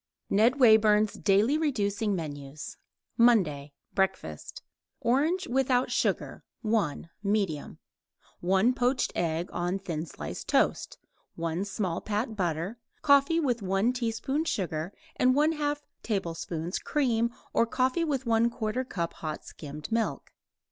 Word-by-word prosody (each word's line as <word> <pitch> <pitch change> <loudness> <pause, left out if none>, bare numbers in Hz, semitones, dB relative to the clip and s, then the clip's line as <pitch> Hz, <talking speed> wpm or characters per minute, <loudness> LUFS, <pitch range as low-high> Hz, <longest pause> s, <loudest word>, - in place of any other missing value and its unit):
NED 230 +7 +4
WAYBURN'S 215 -3 +5
DAILY 215 +9 +3
REDUCING 210 -8 0
MENUS 145 -3 -6 0.4
MONDAY 170 -12 +3 0.2
BREAKFAST 135 - -2 0.4
Orange 305 +10 +1
(without 255 0 +2
sugar) - - -1 0.2
1 205 -8 0
medium; 200 -7 -1 0.6
1 190 +7 +3
poached 250 +1 +1
egg 165 +1 -1
on 175 +2 -1
thin 170 -4 -4
slice - - -6
toast; - - +1 0.4
1 165 +3 -2
small 190 -4 -2
pat 215 +2 -2
butter; 180 +3 -2 0.2
coffee 280 +3 +5
with 250 -7 0
1 195 +5 +1
teaspoon 250 +5 -1
sugar 170 - -2 0.3
and 255 0 +4
1/2 295 0 +2 0.2
tablespoon 170 -4 -3
cream 235 -6 +1 0.2
or 230 - +3
coffee 255 +7 +1
with 275 -5 -1
1/4 230 +1 0
cup 170 -3 -2
hot 155 -1 -6
skimmed 150 +2 -8
milk. 230 0 -1
215 Hz, 115 wpm, -28 LUFS, 175-250 Hz, 0.6 s, WAYBURN'S